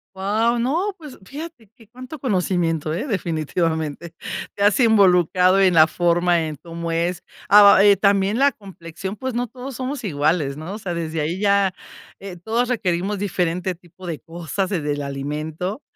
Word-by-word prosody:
Wao, 215 +5 +1
no, 335 - -1
pues 300 -5 -11
fíjate 280 - -9
que 225 -4 -20
cuánto 255 +5 -10
conocimiento, 175 - 0
eh, 175 - -3
definitivamente. 165 - -2 0.4
Te 200 - -1
has 205 +3 +4
involucrado 185 -4 +4
en 190 -2 +4
la 160 -1 +7
forma, 175 0 +1
en 155 - -5
cómo 165 +2 -6
es. 170 +1 -1 0.3
Ah 205 -1 +8
eh, 200 -1 +6
también 200 +2 +2
la 280 0 +4
complexión, 190 -1 -8
pues, 260 +2 -4
no 245 +1 -1
todos 255 +3 -9
somos 260 0 -4
iguales, 150 -3 0
¿no? 160 +6 -7
O - - -7
sea, 185 -4 -4
desde 165 -1 -3
ahí 160 +5 -2
ya, 200 -2 +3 0.5
eh, 195 -2 -8
todos 230 +7 -1
requerimos 195 -3 -1
diferente 180 -2 -1
tipo 180 +1 -14
de 165 -3 -5
cosas, 175 +3 -4
desde 150 -7 -1
el 145 - -4
alimento. 150 - -4
185 Hz, 165 wpm, -21 LUFS, 165-215 Hz, 0.5 s, Ah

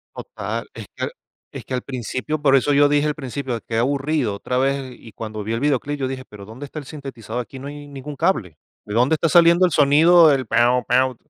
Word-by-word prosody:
Total, - - -5
es - - -8
que - - -5
al - - -2 0.4
es - - -8
que - - -7
al 125 - -1
principio, 130 +4 -4
por 135 -2 +5
eso 140 +2 +2
yo 145 +1 +5
dije, 145 +1 +2
al 150 - -1
principio, 130 -3 -4
qué 115 - -2
aburrido, 135 -2 0
otra 125 +5 -2
vez, 135 -1 -1
y 115 - -14
cuando 110 -1 -6
vi 110 +2 -3
el 115 - -1
videoclip 145 +1 -1
yo 130 - -1
dije: 130 0 -5
"¿Pero 100 -2 -11
dónde 115 +7 -9
está 145 - -11
el 150 - -6
sintetizador? 130 -5 -6
Aquí 130 +2 -10
no 135 +2 -8
hay 145 0 -9
ningún 145 +1 -8
cable, 100 - -1 0.3
¿de 105 - -7
dónde 125 +7 +3
está 165 +1 0
saliendo 170 +2 +6
el 180 - 0
sonido? 155 +3 +6
el 135 -2 0
pau, 125 +1 +2
pau." 130 +1 +2
135 Hz, 235 wpm, -21 LUFS, 125-145 Hz, 0.4 s, saliendo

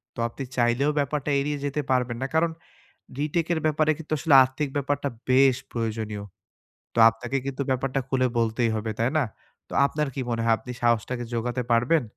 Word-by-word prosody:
তো - - -8
আপনি 125 +4 -7
চাইলেও 120 +4 +2
ব্যাপারটা 145 +1 -1
এড়িয়ে 145 +1 -1
যেতে 145 +1 -1
পারবেন 125 -2 +1
না। 135 - -1
কারন 165 +1 +3 0.7
রিটেক 155 +3 0
এর 160 - -2
ব্যাপারে 155 0 +2
কিন্তু 160 -1 -8
আসলে 155 -1 +3
আর্থিক 135 +3 -3
ব্যাপারটা 145 0 -1 0.2
বেশ 130 0 +5 0.2
প্রয়োজনীয়। 110 -3 -3 0.7
তো - - -12
আপনাকে 120 +4 -4
কিন্তু 140 0 -3
ব্যাপারটা 130 +1 0
খুলে 130 -1 +2
বলতেই 115 +1 +1
হবে। 110 0 -2
তাই 115 +2 +2
না? 155 - +3 0.5
তো - - -9
আপনার 150 +1 -1
কি 135 - -2
মনে 115 -1 -1
হয়? 115 - +4
আপনি 125 +1 -9
সাহস 120 -2 +3
টাকে 125 -1 -3
জোগাতে 120 +2 -1
পারবেন? 120 +6 +3
130 Hz, 180 wpm, -25 LUFS, 120-145 Hz, 0.7 s, বেশ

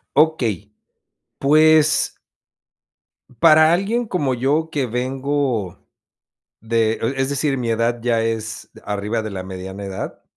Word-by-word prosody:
Okey, 120 - +1 0.7
pues 155 +1 +4 1.3
para 155 -1 +6
alguien 220 +7 0
como 150 - -1
yo 145 +6 0
que 145 -4 -1
vengo 130 -3 -2 0.7
de, 115 0 +1
eh, 115 +4 -2
es 135 0 0
decir, 140 -1 -1
mi 120 -2 -2
edad 115 +1 0
ya 115 -1 +1
es 115 0 -4
de 110 - -16
arriba 105 +2 -2
de 110 - -5
la 95 -2 -5
mediana 95 +1 -7
edad, 95 -1 -6
125 Hz, 125 wpm, -20 LUFS, 110-150 Hz, 1.3 s, para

